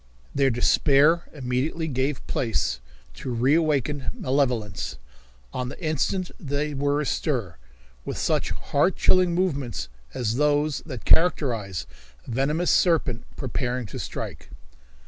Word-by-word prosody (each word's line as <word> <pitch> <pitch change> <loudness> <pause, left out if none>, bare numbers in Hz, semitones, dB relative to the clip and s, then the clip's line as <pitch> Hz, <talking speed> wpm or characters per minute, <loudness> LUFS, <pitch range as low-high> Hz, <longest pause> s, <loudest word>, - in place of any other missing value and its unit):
Their 135 -1 +3
despair 145 +6 +4
immediately 140 +4 -2
gave 135 0 -1
place 85 - -1 0.3
to 65 - -7
reawakened 145 +2 +2
malevolence. 125 - -1 0.6
On 125 -1 -2
the - - -9
instant 170 +3 -1
they 145 0 -2
were 145 +1 +1
astir, 125 - -1 0.5
with - - -4
such - - +1
heart 155 +6 +1
chilling 180 -2 +3
movements 140 - -1 0.3
as 115 -1 -1
those 150 0 +2
that 130 -7 -7
characterize 115 - +2 0.4
a - - -7
venomous 150 +8 +1
serpent 145 -9 +2
preparing 125 -2 -2
to 100 - -7
strike. - - -6
140 Hz, 115 wpm, -25 LUFS, 125-155 Hz, 0.6 s, despair